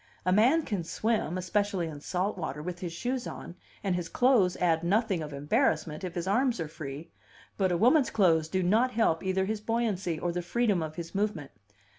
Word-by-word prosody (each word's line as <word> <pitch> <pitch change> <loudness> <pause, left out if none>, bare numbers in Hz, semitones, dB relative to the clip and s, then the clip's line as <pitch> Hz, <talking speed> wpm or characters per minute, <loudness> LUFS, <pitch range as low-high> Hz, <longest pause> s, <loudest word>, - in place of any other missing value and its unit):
A 185 - +2
man 255 - +4
can 200 -10 -2
swim 205 -1 -1
(especially 190 0 0
in 150 -2 -8
salt 185 +6 -1
water) 155 -5 -5
with 180 +1 -5
his 175 -2 -4
shoes 245 +9 -3
on, - - -8 0.3
and 195 -2 0
his 175 -2 -3
clothes 235 -8 +3
add 165 -2 +1
nothing 200 0 +1
of 150 -1 -6
embarrassment, 155 - 0
if 180 -2 -5
his 175 -1 -2
arms 245 +3 +1
are 165 - -2
free; 150 0 -8 0.4
but 190 -2 +1
a 175 - +1
woman's 255 - +4
clothes 165 -7 +3
do 185 +1 0
not 220 +8 +3
help 215 -8 +2
either 190 0 0
his 215 +1 -3
buoyancy 210 -7 -1
or 175 +2 -2
the 175 +1 -2
freedom 205 +1 +1
of 155 -1 -5
his 170 -1 -7
movement. 195 -8 -2
185 Hz, 200 wpm, -29 LUFS, 165-215 Hz, 0.4 s, man